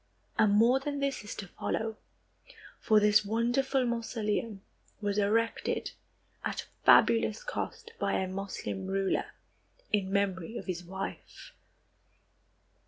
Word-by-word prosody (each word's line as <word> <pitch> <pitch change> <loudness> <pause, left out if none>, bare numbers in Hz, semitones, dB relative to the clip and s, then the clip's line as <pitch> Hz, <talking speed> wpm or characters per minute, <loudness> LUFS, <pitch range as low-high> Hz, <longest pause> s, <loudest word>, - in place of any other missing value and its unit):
And 210 -2 +5
more 235 +5 +5
than 285 +1 -3
this 275 -4 -1
is 210 - -6
to 200 - -6
follow, 220 +4 -3 0.8
for 215 -2 +4
this 210 0 +5
wonderful 245 +5 +1
mausoleum 225 -3 -2 0.4
was 205 -1 0
erected 225 +3 0 0.5
at - - -3 0.2
fabulous - - +5
cost 470 -2 -5
by - - 0
a 190 - 0
Moslem 195 0 -4
ruler, 195 0 0 0.7
in 195 -2 +1
memory 200 +1 0
of - - -6
his 180 -2 -4
wife. 190 +2 -7
210 Hz, 115 wpm, -30 LUFS, 195-235 Hz, 0.8 s, And